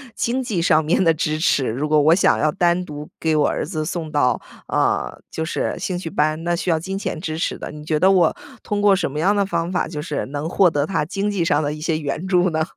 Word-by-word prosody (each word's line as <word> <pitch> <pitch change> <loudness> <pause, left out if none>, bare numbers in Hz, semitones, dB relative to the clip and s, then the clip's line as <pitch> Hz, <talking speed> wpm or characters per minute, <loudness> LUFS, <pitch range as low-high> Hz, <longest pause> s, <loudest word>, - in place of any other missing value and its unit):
经 250 +3 -1
济 210 -9 -2
上 160 -2 +3
面 170 +5 +2
的 165 -2 +4
支 155 -1 -1
持。 145 -5 +2
如 135 +7 -2
果 155 -1 +4
我 155 +3 +5
想 190 - +3
要 155 - +2
单 180 -1 +1
独 150 -2 -8
给 160 -1 +1
我 150 - +3
儿 - - -2
子 155 -4 -3
送 160 -1 -4
到， 145 -4 +1 0.3
呃， - - 0
就 160 - -4
是 160 - -2
兴 180 0 -3
趣 165 - -5
班， 155 +1 0
那 175 0 +1
需 180 - -3
要 165 -2 +2
金 190 +4 -4
钱 195 - -4
支 160 -2 -4
持 - - -2
的。 - - -7
你 150 0 -10
觉 155 -1 0
得 190 - +5
我 180 -4 +4 0.3
通 205 0 -2
过 205 -1 +5
什 190 - -2
么 150 - -4
样 195 +6 +3
的 200 - +2
方 170 -2 -2
法 180 - 0
就 150 -2 -5
是 150 -1 -3
能 145 +3 -4
获 185 0 +4
得 145 -2 0
他 175 -3 -1
经 195 +6 -2
济 200 -4 0
上 155 -2 +2
的 145 0 -1
一 150 - -8
些 160 -1 0
援 150 +4 -3
助 180 -1 +3
呢？ 160 -1 0
165 Hz, 285 characters per minute, -21 LUFS, 150-185 Hz, 0.3 s, 我